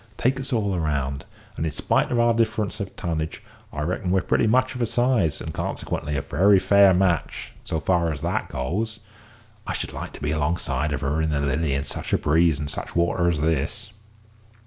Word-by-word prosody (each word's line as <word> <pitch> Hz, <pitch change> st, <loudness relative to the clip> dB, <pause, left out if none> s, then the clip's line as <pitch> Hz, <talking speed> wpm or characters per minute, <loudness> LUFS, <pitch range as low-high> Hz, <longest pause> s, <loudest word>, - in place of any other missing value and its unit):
Take 130 Hz, +2 st, +1 dB
us 135 Hz, +1 st, -5 dB
all 100 Hz, -5 st, +1 dB
round, 70 Hz, -3 st, -2 dB, 0.3 s
and, -, -, -3 dB
in 80 Hz, -, -1 dB
spite -, -, +1 dB
of 120 Hz, -, +1 dB
our 120 Hz, 0 st, +4 dB
difference 110 Hz, -1 st, 0 dB
of 100 Hz, -2 st, -5 dB
tonnage, 80 Hz, -4 st, -3 dB, 0.3 s
I 75 Hz, -, -4 dB
reckon 90 Hz, +3 st, -2 dB
we're 95 Hz, +1 st, +3 dB
pretty -, -, +2 dB
much 130 Hz, +3 st, +3 dB
of 125 Hz, -, -5 dB
a 120 Hz, -, +2 dB
size, 120 Hz, -, +1 dB
and -, -, -6 dB
consequently 75 Hz, 0 st, -3 dB
a -, -, -2 dB
very 100 Hz, +2 st, +4 dB
fair 100 Hz, +1 st, +6 dB
match, 90 Hz, -4 st, 0 dB
so 80 Hz, -, -2 dB
far 85 Hz, -1 st, +1 dB
as 75 Hz, -, -5 dB
that -, -, -1 dB
goes. 100 Hz, -, -3 dB, 0.7 s
I -, -, -1 dB
should -, -, -4 dB
like -, -, -6 dB
to -, -, -10 dB
be 75 Hz, 0 st, -2 dB
alongside 75 Hz, -2 st, -1 dB
of 70 Hz, -1 st, -2 dB
her 75 Hz, +3 st, 0 dB
in 80 Hz, -, 0 dB
the 75 Hz, -2 st, 0 dB
Lily 70 Hz, +1 st, 0 dB
in 70 Hz, -, -1 dB
such -, -, -5 dB
a -, -, +5 dB
breeze 80 Hz, 0 st, +3 dB
and 75 Hz, -, -3 dB
such 70 Hz, -, -5 dB
water 85 Hz, 0 st, +2 dB
as 80 Hz, -3 st, -1 dB
this." 80 Hz, -, -1 dB
85 Hz, 210 wpm, -24 LUFS, 75-105 Hz, 0.7 s, fair